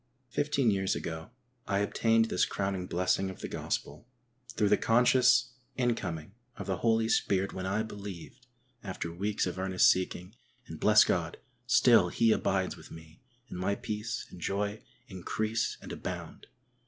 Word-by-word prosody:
Fifteen 140 Hz, -2 st, +1 dB
years 95 Hz, -1 st, 0 dB
ago 80 Hz, +3 st, -5 dB, 0.4 s
I 100 Hz, -, +1 dB
obtained 115 Hz, +2 st, +2 dB
this 90 Hz, -, 0 dB
crowning 95 Hz, -2 st, -2 dB
blessing 95 Hz, +2 st, 0 dB
of 95 Hz, -, -9 dB
the -, -, -4 dB
gospel 75 Hz, +11 st, -4 dB, 0.4 s
through 105 Hz, -4 st, 0 dB
the -, -, +6 dB
conscious 125 Hz, +2 st, +4 dB, 0.2 s
incoming 100 Hz, -10 st, -2 dB, 0.2 s
of -, -, -6 dB
the 95 Hz, -2 st, -1 dB
Holy 115 Hz, +2 st, +2 dB
Spirit 100 Hz, -3 st, +1 dB
when 95 Hz, 0 st, -4 dB
I 105 Hz, +3 st, 0 dB
believed, 105 Hz, +2 st, -9 dB, 0.4 s
after 90 Hz, -4 st, -5 dB
weeks 100 Hz, +4 st, -1 dB
of 90 Hz, 0 st, -4 dB
earnest 95 Hz, -1 st, +4 dB
seeking, 90 Hz, +1 st, -3 dB, 0.3 s
and. -, -, -9 dB
bless -, -, +6 dB
God! -, -, -1 dB, 0.3 s
still 115 Hz, -7 st, +5 dB
He 115 Hz, +5 st, +3 dB
abides 95 Hz, -3 st, 0 dB
with -, -, -14 dB
me 80 Hz, 0 st, -13 dB, 0.3 s
and 90 Hz, -, -7 dB
my 100 Hz, +2 st, 0 dB
peace 105 Hz, +2 st, -4 dB
and 90 Hz, -, -11 dB
joy 100 Hz, +4 st, -2 dB, 0.3 s
increase 110 Hz, +3 st, -2 dB
and -, -, -8 dB
abound. -, -, -7 dB
100 Hz, 155 wpm, -30 LUFS, 90-115 Hz, 0.4 s, the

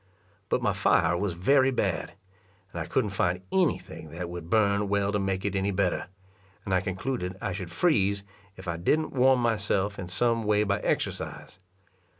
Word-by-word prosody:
But -, -, +1 dB
my -, -, +2 dB
fire 90 Hz, -, +3 dB
was 95 Hz, +1 st, -1 dB
very 130 Hz, +9 st, +4 dB
bad, 130 Hz, -, -1 dB, 0.6 s
and -, -, -4 dB
I -, -, -4 dB
couldn't 105 Hz, -, 0 dB
find 90 Hz, -1 st, 0 dB
any 185 Hz, -4 st, +3 dB
thing 80 Hz, -, -11 dB
that 85 Hz, +2 st, -6 dB
would 85 Hz, -1 st, -7 dB
burn 100 Hz, -1 st, +2 dB
well 100 Hz, 0 st, +1 dB
to 105 Hz, -, 0 dB
make 95 Hz, -1 st, -1 dB
it 100 Hz, -1 st, -1 dB
any 95 Hz, +1 st, +1 dB
better; 95 Hz, -2 st, 0 dB, 0.6 s
and 95 Hz, -, -2 dB
I 90 Hz, -, +3 dB
concluded 95 Hz, 0 st, -3 dB
I -, -, -3 dB
should 90 Hz, -1 st, -5 dB
freeze, 100 Hz, -, +2 dB, 0.3 s
if 95 Hz, -, -10 dB
I 85 Hz, -1 st, -2 dB
didn't 155 Hz, -, +1 dB
warm 130 Hz, 0 st, +4 dB
myself 100 Hz, -3 st, 0 dB
in 90 Hz, -, -5 dB
some 115 Hz, +5 st, +1 dB
way 105 Hz, 0 st, +3 dB
by 100 Hz, 0 st, 0 dB
exercise. -, -, -3 dB
100 Hz, 180 wpm, -27 LUFS, 90-110 Hz, 0.6 s, very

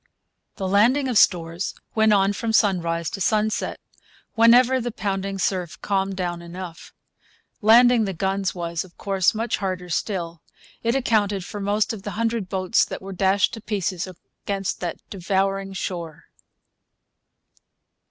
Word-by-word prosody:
The 190 Hz, -3 st, -3 dB
landing 235 Hz, +8 st, +3 dB
of 245 Hz, -5 st, +3 dB
stores 170 Hz, 0 st, +1 dB, 0.2 s
went 220 Hz, -1 st, +4 dB
on 200 Hz, -1 st, +3 dB
from 225 Hz, +2 st, -2 dB
sunrise 170 Hz, -6 st, +2 dB
to 195 Hz, -, -6 dB
sunset, 215 Hz, +2 st, 0 dB, 0.5 s
whenever 245 Hz, +2 st, +5 dB
the 240 Hz, -, -2 dB
pounding 195 Hz, -2 st, -3 dB
surf 180 Hz, -3 st, -2 dB
calmed 195 Hz, -1 st, 0 dB
down 175 Hz, -2 st, -3 dB
enough. 170 Hz, 0 st, -9 dB, 0.7 s
Landing 235 Hz, +1 st, +6 dB
the 195 Hz, -, -3 dB
guns 190 Hz, +1 st, -1 dB
was, 170 Hz, -1 st, -3 dB
of 185 Hz, -2 st, -18 dB
course, 195 Hz, -1 st, +1 dB
much 225 Hz, +1 st, -1 dB
harder 185 Hz, -2 st, -4 dB
still. 170 Hz, -2 st, -3 dB, 0.4 s
It 230 Hz, +2 st, 0 dB
accounted 210 Hz, -7 st, +1 dB
for 205 Hz, -, -7 dB
most 205 Hz, +2 st, 0 dB
of 215 Hz, -, -7 dB
the 205 Hz, +1 st, -6 dB
hundred 225 Hz, -4 st, -1 dB
boats 190 Hz, +2 st, +2 dB
that -, -, -5 dB
were 195 Hz, 0 st, -7 dB
dashed 190 Hz, +1 st, +2 dB
to 225 Hz, -, -7 dB
pieces 190 Hz, -4 st, -2 dB, 0.4 s
against 195 Hz, -2 st, -2 dB
that 175 Hz, -2 st, -4 dB
devouring 195 Hz, +1 st, -1 dB
shore. 170 Hz, -4 st, -6 dB
195 Hz, 140 wpm, -23 LUFS, 180-215 Hz, 0.7 s, Landing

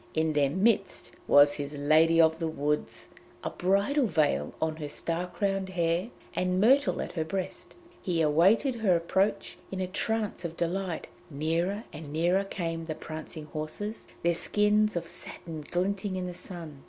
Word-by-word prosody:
In 160 Hz, 0 st, +1 dB
their 145 Hz, -2 st, +3 dB
midst 195 Hz, +4 st, +1 dB, 0.2 s
was 145 Hz, 0 st, +7 dB
his 145 Hz, 0 st, -5 dB
Lady 155 Hz, +3 st, +4 dB
of 160 Hz, 0 st, +5 dB
the 165 Hz, -, -1 dB
Woods, 150 Hz, -1 st, -2 dB, 0.3 s
a -, -, -2 dB
bridal 200 Hz, +9 st, +2 dB
veil 150 Hz, -, +1 dB
on 160 Hz, -1 st, -1 dB
her 150 Hz, -2 st, -5 dB
star 170 Hz, +4 st, -2 dB
crowned 195 Hz, 0 st, -1 dB
hair, 175 Hz, +2 st, 0 dB, 0.2 s
and 180 Hz, 0 st, 0 dB
myrtle 265 Hz, +7 st, +4 dB
at -, -, -7 dB
her 165 Hz, -3 st, -1 dB
breast. 185 Hz, +3 st, -5 dB, 0.3 s
He 175 Hz, -3 st, -1 dB
awaited 190 Hz, -, +4 dB
her 205 Hz, -6 st, +3 dB
approach 190 Hz, +5 st, 0 dB
in 190 Hz, -, -4 dB
a 185 Hz, -, 0 dB
trance 210 Hz, +1 st, -2 dB
of 165 Hz, -1 st, -5 dB
delight; 175 Hz, 0 st, -2 dB, 0.2 s
nearer 165 Hz, +8 st, -1 dB
and 150 Hz, -1 st, -8 dB
nearer 175 Hz, +5 st, +2 dB
came 165 Hz, -4 st, -4 dB
the 155 Hz, -1 st, -4 dB
prancing 155 Hz, 0 st, -7 dB
horses, 155 Hz, +8 st, -5 dB, 0.2 s
their 170 Hz, 0 st, +3 dB
skins 210 Hz, +4 st, +2 dB
of 170 Hz, -1 st, -2 dB
satin 165 Hz, -2 st, -6 dB
glinting 190 Hz, +2 st, -1 dB
in 185 Hz, -1 st, -2 dB
the 180 Hz, -, -5 dB
sun. 170 Hz, -5 st, -7 dB
170 Hz, 165 wpm, -29 LUFS, 155-195 Hz, 0.3 s, was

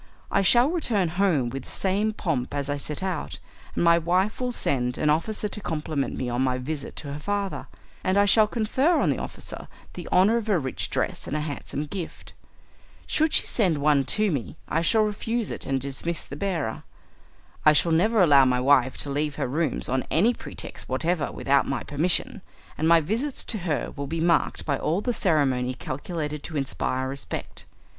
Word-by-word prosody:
I 195 Hz, -, +3 dB
shall 240 Hz, -, +4 dB
return 225 Hz, -, +1 dB
home 165 Hz, -8 st, +1 dB
with 135 Hz, 0 st, -6 dB
the -, -, -14 dB
same 200 Hz, +3 st, 0 dB
pomp 150 Hz, -11 st, -2 dB
as 145 Hz, 0 st, -2 dB
I 145 Hz, -, -1 dB
set 150 Hz, +4 st, -2 dB
out, 185 Hz, -2 st, -3 dB, 0.4 s
and -, -, +1 dB
my 170 Hz, 0 st, +6 dB
wife 185 Hz, +7 st, 0 dB
will 250 Hz, 0 st, 0 dB
send 125 Hz, -, -1 dB
an 150 Hz, -, +2 dB
officer 210 Hz, +7 st, 0 dB
to 210 Hz, -, -6 dB
compliment 150 Hz, -6 st, -2 dB
me 130 Hz, -, -2 dB
on 120 Hz, +1 st, -1 dB
my 130 Hz, -1 st, +1 dB
visit 140 Hz, +3 st, -5 dB
to 140 Hz, -2 st, -6 dB
her 145 Hz, -, -5 dB
father, 200 Hz, +3 st, -3 dB, 0.4 s
and 185 Hz, +1 st, +1 dB
I 200 Hz, -, +5 dB
shall 215 Hz, +1 st, +5 dB
confer 255 Hz, +10 st, +1 dB
on -, -, +2 dB
the -, -, -2 dB
officer -, -, -8 dB, 0.3 s
the -, -, -7 dB
honour 200 Hz, +6 st, +5 dB
of 225 Hz, -2 st, -3 dB
a 200 Hz, -, +4 dB
rich 130 Hz, -5 st, -3 dB
dress -, -, -2 dB
and 150 Hz, -, -2 dB
a -, -, -2 dB
handsome 150 Hz, 0 st, -4 dB
gift. 170 Hz, +2 st, -7 dB, 0.7 s
Should 315 Hz, 0 st, +1 dB
she -, -, +3 dB
send 185 Hz, -9 st, +2 dB
one 145 Hz, -1 st, +3 dB
to 210 Hz, +5 st, +2 dB
me 115 Hz, -, -4 dB
I 165 Hz, -, 0 dB
shall 215 Hz, +6 st, +3 dB
refuse 220 Hz, +2 st, -2 dB
it -, -, -6 dB
and 135 Hz, -1 st, +1 dB
dismiss 140 Hz, +5 st, -3 dB
the -, -, -8 dB
bearer. 160 Hz, -, -2 dB, 0.8 s
I 155 Hz, -, +7 dB
shall 165 Hz, +3 st, +2 dB
never 200 Hz, +6 st, +4 dB
allow 140 Hz, -5 st, +7 dB
my 125 Hz, -1 st, +2 dB
wife 130 Hz, -1 st, +3 dB
to 140 Hz, -, -5 dB
leave 145 Hz, 0 st, -1 dB
her -, -, -2 dB
rooms 150 Hz, +2 st, -1 dB
on 130 Hz, +1 st, -1 dB
any 215 Hz, +10 st, +3 dB
pretext -, -, -9 dB
whatever 170 Hz, -2 st, 0 dB
without 140 Hz, 0 st, +2 dB
my 135 Hz, -, -2 dB
permission, 160 Hz, +5 st, 0 dB, 0.3 s
and 160 Hz, -, 0 dB
my 165 Hz, 0 st, +6 dB
visits 230 Hz, -, -2 dB
to 220 Hz, -, -2 dB
her 165 Hz, -5 st, -2 dB
will 140 Hz, 0 st, -4 dB
be 165 Hz, +3 st, -3 dB
marked 170 Hz, +1 st, +1 dB
by 140 Hz, -3 st, 0 dB
all 170 Hz, +6 st, 0 dB
the 245 Hz, +2 st, -1 dB
ceremony 135 Hz, -, +1 dB
calculated 150 Hz, +3 st, -4 dB
to 160 Hz, -, -4 dB
inspire 130 Hz, -1 st, -1 dB
respect. 135 Hz, +1 st, -6 dB
160 Hz, 195 wpm, -25 LUFS, 140-200 Hz, 0.8 s, I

